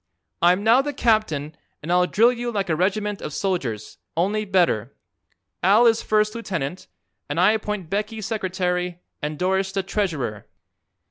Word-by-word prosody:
I'm 180 +3 +4
now 230 +4 +5
the 290 +1 -4
captain 190 - +1 0.3
and 165 - -3
I'll 180 0 +4
drill 230 +6 +4
you 240 0 -3
like 195 -5 -1
a - - +2
regiment 205 +4 -1
of 150 - -5
soldiers, 135 - -3 0.2
only 205 +5 +1
better. 180 - +1 0.7
Al 205 +6 +5
is 230 -1 +4
first 215 0 +1
lieutenant, 180 -8 -4 0.4
and 145 +3 -1
I 185 +4 +6
appoint 210 -5 -3
Becky 215 +2 -2
secretary 180 -4 -2 0.2
and 150 +1 -3
Doris 190 +2 0
the 195 0 -1
treasurer." 160 - -2
190 Hz, 150 wpm, -23 LUFS, 175-215 Hz, 0.7 s, I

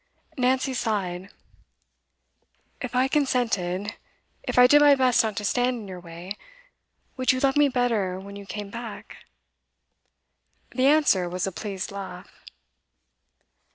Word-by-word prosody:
Nancy 260 +1 +1
sighed. 195 -6 -2 1.5
'If 250 -1 -5
I 255 +1 +3
consented 225 -8 0 0.5
if - - -4
I 250 - +9
did 290 +4 +6
my 290 -1 +7
best 255 -2 +4
not 220 -2 -2
to 210 - -2
stand 245 +3 +1
in 215 -3 -8
your 185 -1 -8
way 175 +3 -8 0.8
would 255 -1 +3
you 255 - -1
love 270 0 +2
me 295 -1 +4
better 225 -8 0
when 200 +1 -10
you 200 -1 -10
came 205 0 -6
back?' 230 -1 -8 1.5
The 255 +2 +2
answer 280 - +3
was 180 0 -2
a 195 - -3
pleased 190 +3 -5
laugh. 190 -2 -9
220 Hz, 135 wpm, -25 LUFS, 190-255 Hz, 1.5 s, I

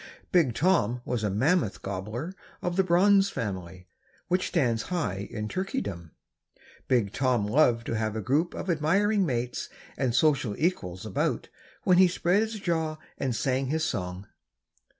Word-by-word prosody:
Big 155 -10 +3
Tom 145 - +2
was 120 -3 -2
a 105 - +1
mammoth 120 - +1
gobbler 105 - -4 0.3
of 180 0 -1
the 190 - +4
bronze 195 +3 +4
family, 95 - -5 0.4
which 180 +1 +1
stands 120 -10 +1
high 105 - -2
in 105 0 -4
Turkeydom. 100 - -4 0.8
Big 115 -6 +2
Tom 125 -5 +1
loved 115 0 +3
to - - -3
have 110 -1 -1
a - - -1
group 145 - 0
of - - -5
admiring 190 +5 +2
mates 125 -2 -2 0.3
and 125 -3 0
social 130 -6 +2
equals 95 - -1
about 105 - -1 0.3
when 180 -1 +4
he 185 - +8
spread 180 +2 +2
his 220 -1 -3
jaw 160 -4 -1 0.2
and 130 -3 -1
sang 130 +2 0
his 155 +3 0
song. 90 - -3
130 Hz, 150 wpm, -27 LUFS, 105-175 Hz, 0.8 s, he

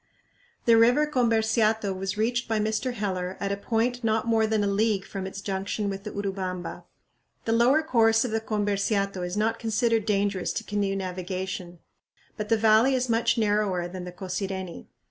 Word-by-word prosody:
The 230 -1 +6
river 245 +6 +5
Comberciato 220 -6 +1
was 195 +2 -3
reached 235 +3 0
by 225 -1 0
Mr. 220 +4 -1
Heller 185 -3 -3
at 200 - -2
a - - +1
point 235 +4 -1
not 220 0 +1
more 225 -1 +2
than 215 -1 +1
a - - +1
league 200 0 +1
from 190 -1 -5
its 195 +1 -7
junction 200 +1 -2
with 195 +1 -7
the - - -3
Urubamba. 190 -3 -4 0.6
The 225 - 0
lower 245 +7 +4
course 225 -5 +3
of 245 - -3
the 225 0 0
Comberciato 200 -2 -1
is 180 +3 -3
not 225 +2 0
considered 225 0 +1
dangerous 200 -2 0
to 225 - -3
canoe 200 -2 -1
navigation, 185 -1 -4 0.6
but 210 -1 -5
the 225 - +4
valley 220 +4 +4
is 255 -1 -1
much 230 +1 +2
narrower 205 -5 +1
than 180 0 -7
the 180 - -7
Cosireni. 190 0 -5
210 Hz, 175 wpm, -26 LUFS, 195-225 Hz, 0.6 s, The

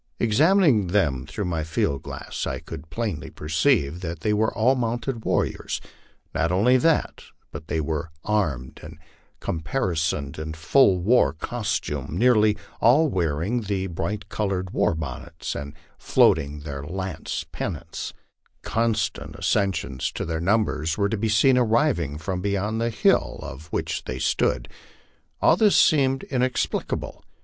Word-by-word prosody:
Examining 135 - +4
them 75 -9 +1
through 80 +6 -4
my 85 -3 -1
field 75 -3 -1
glass, - - -6
1 - - -3
could 80 -1 -9
plainly 105 -5 -3
perceive 80 - +1
that 85 -3 -5
they 105 +5 +1
were 110 +1 +2
all 125 +4 +4
mounted 120 -1 -2
warriors; - - -1 0.5
not 85 +1 +1
only 110 +8 +4
that, 155 +5 +1 0.3
but 80 0 -8
they 80 - -1
were 80 +1 -2
armed 80 - -1
and 75 0 -10 0.4
caparisoned 80 - -2
in 80 0 -5
full 95 +5 +4
war 90 - +3
costume, 80 - -3
nearly 110 -2 +4 0.2
all 145 +7 +5
wearing 90 - 0
the 100 -2 -2
bright 95 +4 -4
colored 95 -3 -2
war - - +1
bonnets 80 +2 -5
and 70 +1 -6 0.2
floating 75 -1 +3
their 70 -2 -6
lance 90 +1 -4
pennants, 80 0 -5 0.5
Constant 115 -1 -1
ac - - 0
cessions 80 -10 -1
to - - -4
their 80 0 -2
numbers 85 -5 +1
were 100 -1 +1
to 110 - 0
be 110 +2 0
seen 125 +4 +4
arriving 115 - +1
from 90 +4 -3
beyond 100 +3 -1
the 115 - +1
hill 110 - +2
oc 65 - -7
which - - -2
they 65 - -4
stood. - - 0 0.8
All - - +6
this 210 +2 +4
seemed 135 -4 +4
inexplicable. 130 -1 -2
95 Hz, 140 wpm, -24 LUFS, 80-115 Hz, 0.8 s, All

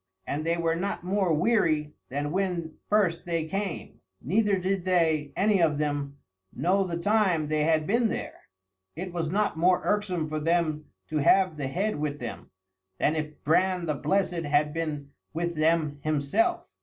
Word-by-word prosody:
And 150 +2 -3
they 165 +1 0
were 165 -1 +1
not 190 +1 -3
more 190 -1 +1
weary 155 -5 +2 0.2
than 145 +2 -2
when 175 -3 -1 0.2
first 190 -6 +1
they 165 -2 -1
came, 195 +1 -4 0.2
neither 200 - +1
did 185 0 -1
they, 160 -5 +1
any 200 -2 +3
of 155 -3 +3
them, 145 -2 -2 0.3
know 185 +8 +1
the 175 -3 -3
time 185 -5 +2
they 155 -1 +1
had 160 -1 +2
been 230 +5 +2
there. - - -6 0.5
It 180 +2 -6
was 165 -3 -2
not 205 -1 0
more 180 +2 +3
irksome 185 -6 0
for 155 0 -3
them 160 -1 0 0.2
to 155 - -1
have 185 +4 +4
the 145 -3 -3
head 195 +8 -1
with 145 -1 -2
them, 120 -4 -7 0.5
than 150 - +1
if 150 -1 -5
Bran 180 +3 +2
the 155 - 0
Blessed 180 +3 0
had 150 0 +1
been 150 -4 -4 0.2
with 170 +1 -1
them 155 -2 +1
himself. 155 - +1
165 Hz, 170 wpm, -27 LUFS, 150-190 Hz, 0.5 s, have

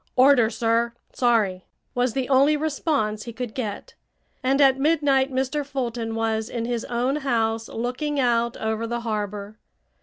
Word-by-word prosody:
"Orders, 255 -3 +5
sir. 235 0 +1 0.2
Sorry," 215 -7 +1 0.3
was 245 -1 +1
the 260 0 -1
only 280 +3 +4
response 290 -8 -1
he 235 - -7
could 245 -2 -5
get, 220 -6 -5 0.5
and 270 +2 +1
at 270 -2 +5
midnight 280 -3 +2
Mr. 265 +3 -1
Fulton 240 -5 -3
was 225 0 -1
in 235 -1 -3
his 235 -1 -2
own 245 +4 0
house 225 -5 0
looking 255 +5 -2
out 235 -2 +1
over 220 +1 -2
the 235 +1 -3
harbor. 210 -1 -4
240 Hz, 150 wpm, -24 LUFS, 225-270 Hz, 0.5 s, Orders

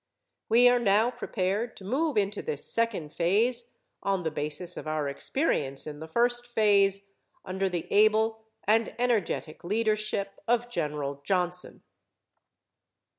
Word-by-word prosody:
We 240 +2 +6
are 245 0 +5
now 220 +2 +3
prepared 220 -1 -2
to - - -10
move 275 +7 0
into 205 0 0
this 145 - -4
second 210 -10 -1
phase, 235 +8 +1 0.3
on 195 -2 0
the 160 - -1
basis 155 +4 -3
of - - -7
our 155 -2 -1
experience 140 - -1
in 150 -1 -7
the 160 - -7
first 240 +7 +2
phase 200 -4 +3 0.4
under 190 +1 -1
the 175 -2 -3
able 220 +1 +3 0.2
and 225 +2 +2
energetic 230 -9 -1
leadership 215 0 -1
of 240 +1 +1
General 145 -6 -3
Johnson. 180 +1 -1
200 Hz, 130 wpm, -28 LUFS, 175-230 Hz, 0.4 s, We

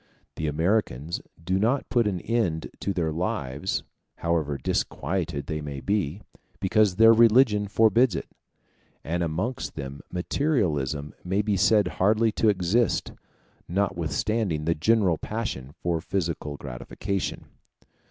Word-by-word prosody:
The 80 - -2
Americans 80 - 0 0.2
do 95 +3 0
not 120 +7 +1
put 120 -4 +3
an 95 -4 -2
end 105 -9 -1
to 100 - -1
their 85 -4 -1
lives, 75 -1 -2 0.3
however 80 -4 -1
disquieted 85 -5 -2
they 75 +1 -3
may 70 -2 -5
be, 100 +1 -1 0.4
because 105 -1 +3
their 115 +2 +8
religion 115 -2 +5
forbids 110 +1 +4
it; - - -3 0.8
and 85 +3 -2
amongst 90 +10 -2
them 70 -1 -6
materialism 85 - 0
may 95 +3 0
be 105 -1 +1
said 105 0 +4
hardly 110 +5 +2
to 110 +1 +2
exist, 100 +4 +1 0.6
notwithstanding 85 0 -1
the 85 - +3
general 90 0 +2
passion 105 - -4
for 85 +1 -2
physical 80 -6 -3
gratification. 85 +10 -4
90 Hz, 125 wpm, -26 LUFS, 80-110 Hz, 0.8 s, their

